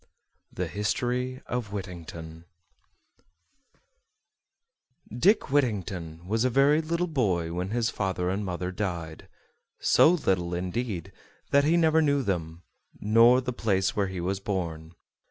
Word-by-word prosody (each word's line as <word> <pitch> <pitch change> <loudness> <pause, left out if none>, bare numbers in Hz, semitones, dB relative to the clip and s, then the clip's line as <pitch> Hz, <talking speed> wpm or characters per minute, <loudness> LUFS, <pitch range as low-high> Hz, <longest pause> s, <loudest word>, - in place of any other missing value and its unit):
THE - - -3
HISTORY 125 +4 -2
OF 120 -5 -4
WHITTINGTON 85 -4 -8 2.7
Dick 180 - +3
Whittington 95 - -1
was 110 +3 +1
a 130 - +3
very 140 +5 +4
little 170 +2 -1
boy 95 - 0
when 90 +2 -3
his 115 +1 0
father 95 -2 -2
and 100 +2 -2
mother 90 -1 -3
died; 85 -5 -5 0.5
so - - +5
little, 95 - 0
indeed, 95 0 -3 0.4
that 140 0 +4
he 165 +3 +3
never 160 -1 +4
knew 145 -2 +2
them, 85 -4 -3 0.4
nor 115 +4 +5
the 125 0 -3
place 95 -5 0
where 100 -2 +1
he 95 -1 -5
was 95 +3 -2
born. 85 -5 -4
100 Hz, 125 wpm, -27 LUFS, 90-125 Hz, 2.7 s, so